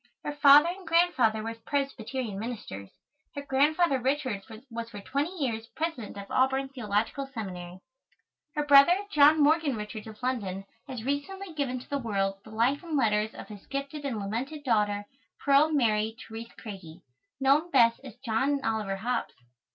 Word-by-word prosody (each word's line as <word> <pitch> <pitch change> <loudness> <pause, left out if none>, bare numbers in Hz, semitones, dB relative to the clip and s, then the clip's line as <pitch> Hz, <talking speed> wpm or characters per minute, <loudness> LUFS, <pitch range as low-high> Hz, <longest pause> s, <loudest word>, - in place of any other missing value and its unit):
Her 295 - -2
father 290 +2 +7
and 365 0 -7
grandfather 295 -11 +3
were 225 +1 -3
Presbyterian 245 -3 -3
ministers. 205 - -6 0.5
Her 285 - -4
Grandfather 285 +2 +2
Richards 255 -6 -1 0.2
was 230 0 -5
for 205 - -8
twenty 280 +9 -2
years 230 -7 -2
President 315 -11 -4
of 200 - -6
Auburn 265 +1 +2
Theological 235 +2 -2
Seminary. 185 -6 -7 0.7
Her 295 -1 0
brother, 285 +5 +7
John 300 0 +6
Morgan 300 -2 +3
Richards 215 +1 -6
of 220 +2 -12
London, 200 -7 -2 0.2
has 255 -5 -6
recently 330 +8 -3
given 275 -4 -2
to - - -15
the 280 - -2
world 195 -5 -1
the - - -13
Life 235 +6 +1
and 330 -4 -2
Letters 215 -3 +1
of - - -9
his 205 -2 -11
gifted 275 +2 -4
and 265 -5 -2
lamented 240 +9 -4
daughter, 210 -5 +1 0.4
Pearl 280 +2 +5
Mary 220 -7 +1
Terèse 225 +1 -9
Craigie, 185 -6 -10 0.4
known 280 +5 +3
best 235 -6 +4
as 255 -6 -10
John 265 +5 +1
Oliver 215 -3 -1
Hobbes. 235 +5 -2
250 Hz, 160 wpm, -28 LUFS, 215-285 Hz, 0.7 s, father